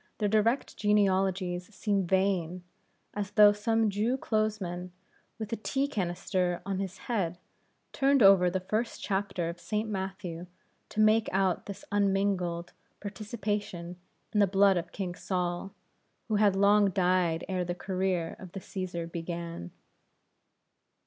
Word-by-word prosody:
their 210 Hz, -, +1 dB
direct 220 Hz, +5 st, +1 dB
genealogies 190 Hz, -3 st, +1 dB
seem 200 Hz, -3 st, 0 dB
vain 185 Hz, -2 st, +1 dB, 0.5 s
as 205 Hz, -1 st, -3 dB
though 210 Hz, 0 st, +7 dB
some 225 Hz, +1 st, +1 dB
Jew 215 Hz, +5 st, 0 dB
clothesman, 205 Hz, -7 st, -2 dB, 0.5 s
with 220 Hz, 0 st, -5 dB
a -, -, +2 dB
tea 270 Hz, +5 st, -1 dB
canister 180 Hz, -5 st, -1 dB
on 195 Hz, -1 st, -2 dB
his 195 Hz, 0 st, -4 dB
head, 185 Hz, -8 st, -1 dB, 0.6 s
turned 275 Hz, -2 st, +4 dB
over 195 Hz, -2 st, +7 dB
the 185 Hz, +1 st, -2 dB
first 215 Hz, +5 st, -2 dB
chapter 195 Hz, -3 st, -1 dB
of 170 Hz, +1 st, -5 dB
St. 215 Hz, +4 st, -2 dB
Matthew 190 Hz, -4 st, -5 dB, 0.4 s
to 215 Hz, -, -5 dB
make 215 Hz, +1 st, +4 dB
out 190 Hz, -2 st, +1 dB
his 200 Hz, -, -8 dB
unmingled 195 Hz, -4 st, 0 dB, 0.3 s
participation 205 Hz, -4 st, -4 dB, 0.4 s
in 210 Hz, -, +2 dB
the 200 Hz, -, +5 dB
blood 195 Hz, +1 st, +4 dB
of 175 Hz, 0 st, -3 dB
King 185 Hz, -3 st, -4 dB
Saul, 180 Hz, +1 st, -2 dB, 0.6 s
who 215 Hz, -, +2 dB
had 205 Hz, -2 st, +4 dB
long 200 Hz, +1 st, +5 dB
died 180 Hz, -3 st, +1 dB
ere 185 Hz, -1 st, -1 dB
the 175 Hz, 0 st, -3 dB
career 185 Hz, -3 st, -1 dB
of 185 Hz, -2 st, -11 dB
the 195 Hz, -, -5 dB
Cæsar 185 Hz, -3 st, -5 dB
began. 170 Hz, -, -5 dB
195 Hz, 135 wpm, -29 LUFS, 180-210 Hz, 0.6 s, though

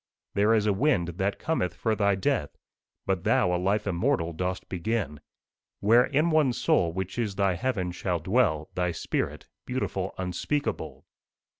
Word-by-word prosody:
There 105 Hz, +3 st, +4 dB
is 105 Hz, -1 st, +2 dB
a 105 Hz, -, +3 dB
wind 105 Hz, -, +2 dB
that 100 Hz, +1 st, 0 dB
cometh 90 Hz, -, -1 dB
for 110 Hz, +5 st, 0 dB
thy 100 Hz, -2 st, +2 dB
death, 95 Hz, -, -1 dB, 0.5 s
But 95 Hz, -2 st, -1 dB
thou 125 Hz, -8 st, +3 dB
a 90 Hz, -, -1 dB
life 100 Hz, +3 st, +1 dB
immortal 85 Hz, -3 st, 0 dB
dost 90 Hz, +3 st, -3 dB
begin, 90 Hz, -5 st, -2 dB, 0.6 s
Where, 115 Hz, +4 st, +5 dB
in 155 Hz, +4 st, +1 dB
one 150 Hz, -5 st, +3 dB
soul, 85 Hz, -7 st, +2 dB
which 95 Hz, +5 st, -4 dB
is 105 Hz, -4 st, -1 dB
thy 100 Hz, -2 st, +2 dB
heaven, 95 Hz, -2 st, -1 dB
shall 90 Hz, 0 st, -1 dB
dwell 85 Hz, -4 st, +1 dB
Thy 90 Hz, -1 st, 0 dB
spirit, -, -, -3 dB, 0.2 s
beautiful -, -, -3 dB
Unspeakable!" 95 Hz, +11 st, -3 dB
95 Hz, 155 wpm, -27 LUFS, 90-115 Hz, 0.6 s, Where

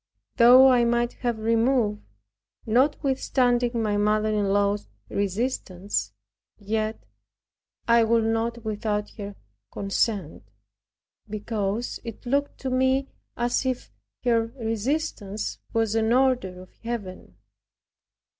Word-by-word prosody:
Though 250 Hz, +2 st, +8 dB
I 245 Hz, -1 st, +4 dB
might 240 Hz, 0 st, +1 dB
have 240 Hz, -3 st, 0 dB
removed, 225 Hz, -1 st, +1 dB, 0.6 s
notwithstanding 250 Hz, -2 st, +1 dB
my 210 Hz, -1 st, 0 dB
mother 215 Hz, +1 st, +2 dB
in 210 Hz, -1 st, +1 dB
law's 200 Hz, +1 st, +1 dB, 0.2 s
resistance, 200 Hz, -, -2 dB, 0.5 s
yet 215 Hz, +1 st, -3 dB, 0.8 s
I 235 Hz, 0 st, +5 dB
would 230 Hz, 0 st, +3 dB
not 225 Hz, +1 st, -1 dB
without 210 Hz, -1 st, -2 dB
her 200 Hz, 0 st, -6 dB, 0.4 s
consent; 195 Hz, -3 st, -1 dB, 0.9 s
because 215 Hz, +1 st, -3 dB
it 230 Hz, 0 st, -8 dB
looked 280 Hz, +3 st, 0 dB
to 265 Hz, -, -2 dB
me 260 Hz, +1 st, +2 dB, 0.3 s
as 240 Hz, +2 st, 0 dB
if 255 Hz, -, -3 dB, 0.3 s
her 230 Hz, -2 st, +2 dB
resistance 225 Hz, -2 st, -2 dB
was 225 Hz, -2 st, +1 dB
an 225 Hz, +1 st, +2 dB
order 245 Hz, -9 st, +1 dB
of 185 Hz, -, -19 dB
Heaven. 205 Hz, -, -6 dB
225 Hz, 105 wpm, -25 LUFS, 210-245 Hz, 0.9 s, Though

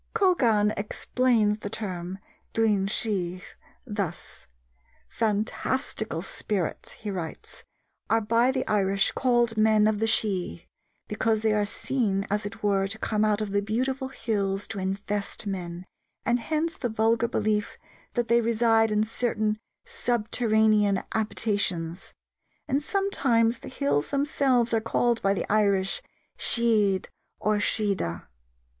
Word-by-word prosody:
Colgan 240 Hz, -, +3 dB
explains 215 Hz, +1 st, +1 dB
the 205 Hz, -, -5 dB
term 185 Hz, -4 st, -5 dB, 0.4 s
Duine 210 Hz, -4 st, +2 dB
Sidh 185 Hz, -5 st, -2 dB, 0.4 s
thus: 200 Hz, -7 st, -5 dB, 0.6 s
"Fantastical 220 Hz, -, -1 dB
spirits," 195 Hz, -3 st, -3 dB
he 210 Hz, -2 st, -6 dB
writes, 170 Hz, -4 st, -6 dB, 0.5 s
"are 225 Hz, -, +4 dB
by 230 Hz, +3 st, +2 dB
the 260 Hz, -1 st, -2 dB
Irish 195 Hz, -2 st, +2 dB
called 240 Hz, -3 st, +1 dB
men 215 Hz, -1 st, +4 dB
of 215 Hz, -1 st, +2 dB
the 225 Hz, -, +1 dB
Sidh, 190 Hz, -, 0 dB, 0.4 s
because 220 Hz, +1 st, 0 dB
they 220 Hz, -1 st, +2 dB
are 210 Hz, -1 st, +1 dB
seen, 205 Hz, -3 st, -1 dB
as 205 Hz, 0 st, 0 dB
it 205 Hz, -, -11 dB
were, 195 Hz, -1 st, +2 dB
to 210 Hz, +3 st, -4 dB
come 215 Hz, -1 st, 0 dB
out 215 Hz, 0 st, +2 dB
of 210 Hz, -2 st, -3 dB
the 200 Hz, 0 st, +1 dB
beautiful 260 Hz, +6 st, -1 dB
hills 205 Hz, -6 st, -2 dB
to 200 Hz, -, -4 dB
infest 200 Hz, +2 st, -3 dB
men, 180 Hz, -3 st, -5 dB, 0.4 s
and 240 Hz, +1 st, +2 dB
hence 315 Hz, +6 st, -1 dB
the 245 Hz, -, -3 dB
vulgar 225 Hz, +1 st, +2 dB
belief 210 Hz, -2 st, -1 dB, 0.4 s
that 240 Hz, -1 st, 0 dB
they 235 Hz, 0 st, +4 dB
reside 225 Hz, -1 st, +3 dB
in 210 Hz, 0 st, +2 dB
certain 215 Hz, -1 st, -1 dB, 0.3 s
subterranean 220 Hz, -, +1 dB
habitations: 200 Hz, -6 st, -1 dB, 0.5 s
and 275 Hz, +2 st, +1 dB
sometimes 270 Hz, -, +1 dB
the -, -, -10 dB
hills 260 Hz, -, 0 dB
themselves 275 Hz, -4 st, +2 dB
are 225 Hz, -, +2 dB
called, 235 Hz, +1 st, +1 dB
by 195 Hz, 0 st, +2 dB
the -, -, -2 dB
Irish, 200 Hz, -2 st, +2 dB, 0.4 s
Sidhe 215 Hz, -5 st, +2 dB, 0.3 s
or 210 Hz, 0 st, +1 dB
Siodha." 200 Hz, -, 0 dB
215 Hz, 130 wpm, -26 LUFS, 200-235 Hz, 0.6 s, are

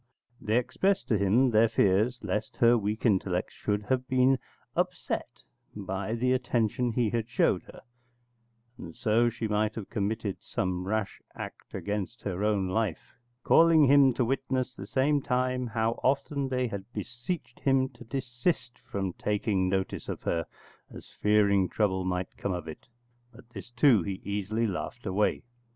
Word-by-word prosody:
They 110 Hz, +2 st, +1 dB
expressed 190 Hz, +11 st, 0 dB
to 110 Hz, -, +3 dB
him 115 Hz, +6 st, +3 dB
their 110 Hz, +1 st, +5 dB
fears 105 Hz, +7 st, +2 dB
lest 105 Hz, +1 st, -3 dB
her 120 Hz, 0 st, +5 dB
weak 105 Hz, +1 st, -2 dB
intellects 95 Hz, -4 st, +1 dB
should 105 Hz, 0 st, -2 dB
have 130 Hz, +3 st, -1 dB
been 130 Hz, 0 st, +3 dB, 0.4 s
upset -, -, -2 dB, 0.3 s
by 100 Hz, +2 st, -3 dB
the 125 Hz, +2 st, +1 dB
attention 120 Hz, -1 st, 0 dB
he 115 Hz, -3 st, +1 dB
had 115 Hz, -1 st, -2 dB
showed -, -, +2 dB
her, -, -, -13 dB, 1.0 s
and 85 Hz, -1 st, -9 dB
so 115 Hz, +2 st, +2 dB
she 115 Hz, -1 st, -4 dB
might 105 Hz, +1 st, 0 dB
have 110 Hz, -4 st, -7 dB
committed 105 Hz, -1 st, -2 dB
some 90 Hz, 0 st, -2 dB
rash 110 Hz, -1 st, -2 dB
act -, -, -8 dB
against 105 Hz, +3 st, -4 dB
her 100 Hz, 0 st, -3 dB
own 105 Hz, -3 st, +1 dB
life, 95 Hz, -2 st, -2 dB, 0.3 s
calling 165 Hz, -2 st, +6 dB
him 140 Hz, 0 st, +6 dB
to 125 Hz, -, +1 dB
witness 130 Hz, 0 st, -1 dB
the 100 Hz, -4 st, -9 dB
same 140 Hz, +4 st, +2 dB
time 125 Hz, 0 st, 0 dB
how 115 Hz, 0 st, 0 dB
often 140 Hz, 0 st, 0 dB
they 130 Hz, -1 st, 0 dB
had 100 Hz, -1 st, -6 dB
beseeched 125 Hz, +1 st, -5 dB
him 135 Hz, -1 st, +2 dB
to 120 Hz, -2 st, -14 dB
desist 125 Hz, +1 st, -2 dB
from 95 Hz, -2 st, -3 dB
taking 100 Hz, -2 st, 0 dB
notice 95 Hz, 0 st, -2 dB
of -, -, -5 dB
her, 85 Hz, -1 st, -1 dB, 0.4 s
as -, -, -12 dB
fearing 100 Hz, -3 st, +3 dB
trouble 95 Hz, -2 st, 0 dB
might 90 Hz, 0 st, -2 dB
come 100 Hz, -, -2 dB
of 85 Hz, -2 st, -5 dB
it: 80 Hz, -, -9 dB, 0.4 s
but 120 Hz, 0 st, -16 dB
this, 120 Hz, -, -9 dB
too, 120 Hz, -3 st, +4 dB
he 95 Hz, +2 st, -4 dB
easily 105 Hz, +3 st, -1 dB
laughed 110 Hz, +4 st, -4 dB
away. 100 Hz, +1 st, +1 dB
110 Hz, 160 wpm, -28 LUFS, 100-125 Hz, 1.0 s, calling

